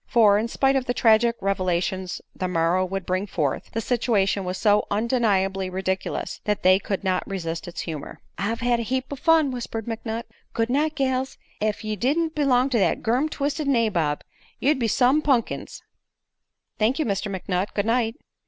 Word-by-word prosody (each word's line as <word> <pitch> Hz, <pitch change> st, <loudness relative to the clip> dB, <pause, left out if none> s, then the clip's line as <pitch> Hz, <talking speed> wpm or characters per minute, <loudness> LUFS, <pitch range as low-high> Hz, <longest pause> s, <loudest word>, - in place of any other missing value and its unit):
For, 210 Hz, -4 st, +5 dB
in 225 Hz, -, -1 dB
spite 270 Hz, +3 st, +2 dB
of 265 Hz, -2 st, +1 dB
the 245 Hz, -, -1 dB
tragic 230 Hz, +1 st, +4 dB
revelations 185 Hz, -1 st, -1 dB
the 185 Hz, -, -2 dB
morrow 175 Hz, +1 st, +2 dB
would 190 Hz, 0 st, -3 dB
bring 185 Hz, +2 st, -1 dB
forth, 150 Hz, -8 st, -2 dB
the 225 Hz, -, -1 dB
situation 210 Hz, -5 st, +1 dB
was 180 Hz, +1 st, -3 dB
so 210 Hz, 0 st, +3 dB
undeniably 200 Hz, -4 st, +1 dB
ridiculous 190 Hz, 0 st, -3 dB
that 210 Hz, -1 st, -1 dB
they 185 Hz, +1 st, +6 dB
could 195 Hz, -1 st, -3 dB
not 185 Hz, -1 st, +1 dB
resist 170 Hz, -4 st, -4 dB
its 175 Hz, -, -5 dB
humor. 155 Hz, -4 st, -6 dB, 0.2 s
"I've 215 Hz, +5 st, -2 dB
had 240 Hz, 0 st, +2 dB
a -, -, -1 dB
heap 260 Hz, +4 st, -2 dB
o' -, -, -3 dB
fun," 315 Hz, 0 st, +3 dB
whispered 230 Hz, -3 st, -5 dB
McNutt. 225 Hz, 0 st, -4 dB, 0.3 s
"Good 230 Hz, +1 st, 0 dB
night, 305 Hz, +3 st, +1 dB
gals. 265 Hz, -2 st, -1 dB, 0.2 s
Ef 215 Hz, 0 st, -1 dB
ye 215 Hz, 0 st, -2 dB
didn't 310 Hz, -, 0 dB
belong 275 Hz, -3 st, +2 dB
to 235 Hz, -, +2 dB
thet 195 Hz, -, +1 dB
gum 250 Hz, +7 st, +1 dB
twisted 290 Hz, 0 st, -2 dB
nabob, 210 Hz, -, +1 dB, 0.4 s
ye'd 285 Hz, +1 st, +2 dB
be 235 Hz, -, +1 dB
some 260 Hz, +6 st, +3 dB
pun'kins." 265 Hz, -7 st, -1 dB, 1.0 s
"Thank 225 Hz, +5 st, +2 dB
you, 315 Hz, -, 0 dB
Mr. 200 Hz, 0 st, -1 dB
McNutt. 185 Hz, 0 st, -2 dB
Good 205 Hz, -, 0 dB
night." 230 Hz, 0 st, +1 dB
220 Hz, 180 wpm, -24 LUFS, 190-255 Hz, 1.0 s, they